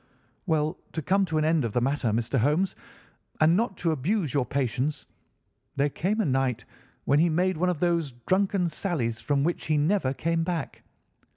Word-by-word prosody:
"Well, 155 0 0
to 160 - -3
come 195 +4 +2
to 160 -3 -2
an 155 - +2
end 160 -2 +2
of 115 -3 -3
the - - +2
matter, 135 0 0
Mr. 115 +4 0
Holmes, 150 - +1 0.6
and 155 +2 +5
not 220 -1 0
to 165 - 0
abuse 160 - -1
your 135 -4 +1
patience, 135 +2 -1 0.7
there 140 +1 +2
came 200 +10 -1
a - - 0
night 130 -3 0 0.4
when 140 +1 +3
he 170 +2 +4
made 180 +3 +1
one 180 +3 +1
of 180 - -1
those 170 -3 0
drunken 190 -1 +2
sallies 145 - -2
from 140 -1 +1
which 170 +3 -2
he 155 -1 +2
never 150 -2 +1
came 165 +2 0
back. 170 -1 -4
155 Hz, 185 wpm, -27 LUFS, 135-180 Hz, 0.7 s, and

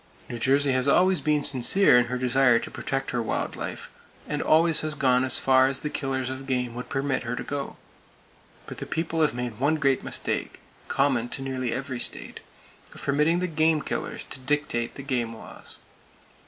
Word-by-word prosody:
New 120 - -6
Jersey 135 +2 +2
always 170 +8 +3
has - - -13
been 150 -2 +1
sincere 140 +6 +5
in 125 0 +5
her 125 +1 -3
desire 125 -1 +3
to - - -5
protect 135 0 -3
her 120 - -1
wild 110 - -3
life, - - -7 0.4
and - - -2
always 160 +1 +4
has 155 0 -2
gone 130 -3 +2
as 130 -1 +4
far 130 0 +4
as 135 0 -1
the 150 - -4
killers 130 -2 -3
of 130 +1 -8
game 125 -2 -1
would 125 +1 -7
permit 135 -1 -1
her 120 0 -4
to - - -5
go! 140 -1 -5 0.9
But - - -9
the - - -6
People 165 0 -2
have 150 -6 +2
made 120 -3 -5
one 145 +4 +2
great 135 -4 +1
mistake,—common 130 -4 -2
to 135 - -5
nearly 130 -2 -3
every 130 -1 -4
state,—of - - -10
permitting 150 +5 +1
the - - 0
game 155 -2 +1
killers - - -4
to 135 - -6
dictate 130 -3 -2
the 140 - -8
game 120 -4 -2
laws! - - -10
135 Hz, 185 wpm, -25 LUFS, 125-150 Hz, 0.9 s, sincere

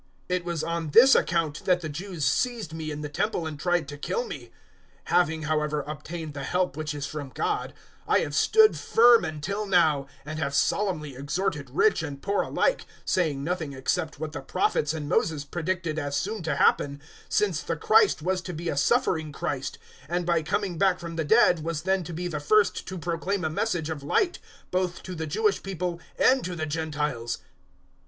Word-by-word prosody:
026:021 180 - +3
"It 175 - -8
was 170 -3 -2
on 165 -1 -2
this 255 - +8
account 165 -3 +1
that 180 -1 +3
the 160 - -4
Jews 165 0 -4
seized 220 - 0
me 160 -1 -4
in 150 0 -5
the 150 - -3
Temple 170 +3 -1
and 155 -2 -5
tried 175 -2 +1
to 145 0 -8
kill 475 - -2
me. - - -7
026:022 - - -28 0.5
Having, 160 -3 +2
however, 150 -1 0
obtained 155 +1 -6
the 140 -1 -5
help 180 -2 0
which 155 -1 -4
is 145 -1 -3
from 145 -2 -6
God, 425 -1 -1 0.4
I - - +4
have - - -3
stood 440 -1 +5
firm 235 0 +5
until 195 +7 -3
now, 160 -7 +3 0.2
and 155 +1 -5
have 140 -2 -1
solemnly 155 -7 0
exhorted 145 +1 -2
rich 165 +9 +3
and 145 -3 -5
poor 200 +6 0
alike, - - 0 0.2
saying 150 -7 0
nothing 160 -3 -2
except 145 +4 -2
what 155 0 -4
the - - -6
Prophets 160 - 0
and 150 -2 -4
Moses 150 -1 +1
predicted 170 0 -2
as 145 -1 -3
soon 210 +8 -2
to 160 -3 -1
happen, 140 0 +3
026:023 140 - -17 0.3
since 420 - +1
the - - -2
Christ 435 - +4
was 185 +1 0
to 180 0 -6
be 170 +2 -3
a 145 - -2
suffering 160 - +2
Christ, 135 -1 -3 0.3
and 175 0 -1
by 170 -2 +2
coming 175 +2 -2
back 190 -2 +3
from 170 -1 -6
the 165 - -1
dead 180 -3 +4
was 160 -1 -3
then 190 0 +1
to 175 - -7
be 175 +2 -3
the 155 -4 -3
first 205 +8 +2
to 190 - -5
proclaim 175 +2 -2
a 155 - 0
message 165 -4 -1
of 150 -3 -5
light 345 - +1 0.3
both 180 -1 -1
to 185 - -6
the 160 -2 -4
Jewish 210 +6 +1
people 180 -2 -3 0.2
and 260 0 +4
to 180 -1 -4
the 155 -1 -2
Gentiles." 150 -6 -2
165 Hz, 200 wpm, -26 LUFS, 150-185 Hz, 0.5 s, this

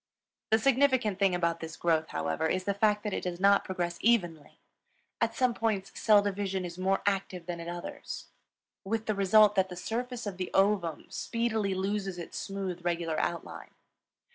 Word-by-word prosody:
The 220 - +5
significant 260 -4 +2
thing 195 -3 +3
about 170 -1 0
this 160 0 -7
growth, 160 -2 +1
however, 80 - -1
is 185 +3 0
the 200 - 0
fact 210 +1 +2
that 210 -2 -2
it - - -2
does 180 -1 -4
not 200 +1 +5
progress 175 -2 -3
evenly. 175 -10 +1 0.6
At 230 0 +1
some 255 -1 +2
points 210 -4 -1
cell 210 -2 +4
division 195 -2 -2
is 170 -1 -6
more 190 +1 +1
active 195 -3 -1
than 175 -1 -4
at 170 - -7
others, 175 0 -6 0.6
with 220 +3 -2
the 215 - 0
result 205 +1 +5
that 190 -2 +2
the 180 - -7
surface 240 +6 -4
of 200 -3 -5
the 185 -1 -3
ovum 195 -5 +2
speedily 220 -4 -1
loses 195 -1 -2
its 170 - -6
smooth, 190 -3 -4
regular 170 -2 -1
outline. 170 -1 -4
195 Hz, 175 wpm, -30 LUFS, 175-210 Hz, 0.6 s, The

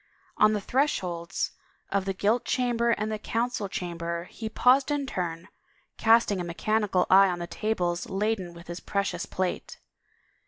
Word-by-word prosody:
On 215 0 +5
the 210 - -1
thresholds 190 - -1 0.4
of 195 -1 +1
the 195 - -1
gilt 215 +5 +1
chamber 240 -2 +1
and 215 -2 0
the 215 - -3
council 230 -2 -2
chamber 170 -2 -4
he 220 -1 -5
paused 255 +5 +4
in 290 -1 0
turn, 175 -7 -4 0.5
casting 225 -4 +4
a - - -3
mechanical 195 +2 0
eye 195 +1 +8
on 175 - -2
the 175 - -4
tables 175 -3 -2
laden 195 -3 -1
with 170 0 -12
his 175 +1 -6
precious 200 0 -2
plate. 185 -1 -3
200 Hz, 155 wpm, -27 LUFS, 175-225 Hz, 0.5 s, eye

